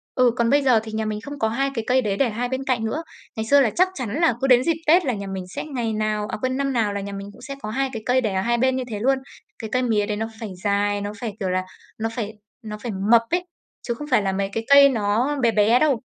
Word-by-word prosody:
Ừ, 250 -2 +4
còn 235 -1 +2
bây 285 +1 +4
giờ 255 -5 +4
thì 220 - -8
nhà 220 0 -2
mình 210 0 -3
không 285 +2 -8
có 220 - +2
2 275 +4 0
cái 230 -3 -3
cây 255 +1 +3
đấy 200 -3 -1
để 265 -4 +2
hai 245 +3 -3
bên 260 +1 -2
cạnh 245 -4 0
nữa. 310 +9 -2 0.3
Ngày 220 0 -3
xưa 285 +4 +5
là 240 - +3
chắc 370 +1 +4
chắn 255 - -4
là 330 -7 +4
cứ 270 - +2
đến 250 -1 +6
dịp 335 - +2
Tết 345 +1 +5
là 255 - 0
nhà 200 -1 -5
mình 190 -1 -4
sẽ - - -5
ngày 240 -7 -3
nào 215 -1 -1
à, - - -3
quên, 255 +1 -1
năm 275 -1 -1
nào 215 -4 +1
là 200 - -3
nhà 200 - -6
mình 200 0 -7
cũng - - -17
sẽ 275 -1 -7
có 215 - -5
2 270 +4 -1
cái 220 -1 -5
cây 255 +1 +3
để 210 -4 -1
ở 190 - 0
hai 235 +3 +1
bên 260 +1 +2
như 260 - -2
thế 210 -2 -4
luôn. 265 +4 +2 0.4
Cái 220 - -6
cây 255 - +2
mía 215 -4 +1
đấy 210 -1 -3
nó 225 +1 -2
phải 220 -4 -5
dài, 205 0 +1
nó 205 - -4
phải, 225 -4 -4
kiểu 190 -2 -1
là, 185 0 0 0.4
nó 225 +1 -1
phải 220 -3 -3 0.3
nó 210 0 -5
phải 225 +2 -5 0.2
mập 235 -1 +7
ấy, 355 +1 0 0.4
chứ 235 - 0
không 295 +5 -8
phải 255 - +4
là 195 -1 0
mấy 195 0 -1
cái 225 - -2
cây 280 0 +9
nó 235 +4 0
bé 230 -1 +4
bé 220 +4 +4
đâu. 280 -7 +2
230 Hz, 305 wpm, -23 LUFS, 210-260 Hz, 0.4 s, cây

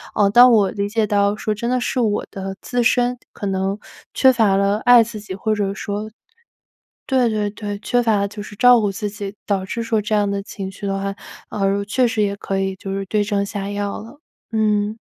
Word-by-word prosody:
呃， 205 -1 +4
当 245 +3 +8
我 200 -4 +3
理 200 -1 -2
解 220 +1 +1
到 205 0 +2
说 215 0 -2
真 235 +3 -3
的 255 0 +1
是 255 - -1
我 215 -4 0
的 195 0 -5
自 245 -1 -1
身 245 +1 +2 0.2
可 205 - -6
能 195 +1 -1 0.4
缺 265 - +5
乏 220 -5 +3
了 200 +1 +1
爱 245 0 +7
自 220 -1 -7
己， 205 -2 -7
或 215 +3 -1
者 200 -2 -1
说 205 +1 -4 1.0
对 260 -2 +3
对 210 -2 -1
对， 205 -1 -6
缺 245 +3 +1
乏 215 -4 +2
就 205 +1 -8
是 205 - -11
照 245 +2 +6
顾 205 - +1
自 205 +2 -4
己， 205 -1 -7
导 195 -2 -1
致 230 +4 -4
说 225 -1 0
这 215 +1 -1
样 205 -1 +2
的 200 0 -2
情 195 -1 -7
绪 200 +1 -7
的 195 0 -1
话， 195 0 -3 0.4
呃， 200 0 0
确 245 +5 +2
实 225 -2 -1
也 200 -1 -1
可 195 -1 -3
以 195 0 -1
就 195 +1 -6
是 195 0 -3
对 210 +2 +1
症 200 -1 -1
下 200 -1 -5
药 205 0 -3
了， 230 +7 -12 0.3
嗯。 210 -1 +1
205 Hz, 240 characters per minute, -20 LUFS, 200-225 Hz, 1.0 s, 当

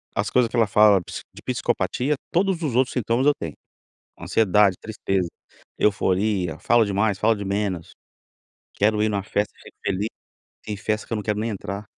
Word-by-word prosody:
as 100 - 0
coisas 125 -2 +3
que - - -3
ela 115 -2 +4
fala 105 -1 +5
psi - - -7
de - - -12
psicopatia, 140 +4 0 0.2
todos 180 -1 +1
os 140 -7 -1
outros 130 0 +3
sintomas 120 +1 0
eu 145 - +6
tenho: 80 - -6 0.7
ansiedade, 105 -3 +3
tristeza, 95 -4 -2 0.5
euforia, 95 -3 +1
fala 120 -1 +4
demais, 100 0 0
fala 110 0 +3
de 100 - -5
menos, 100 -4 -2 0.8
quero 105 +1 +2
ir 110 - +3
numa 100 -2 -1
festa, 105 0 -1
chego - - -15
feliz, 100 +3 0 0.6
tem 105 - -4
festa 105 +2 -2
que - - -10
eu - - +1
não 105 - -3
quero 105 0 -1
nem 115 +2 -1
entrar. 100 0 -5
105 Hz, 180 wpm, -23 LUFS, 100-115 Hz, 0.8 s, eu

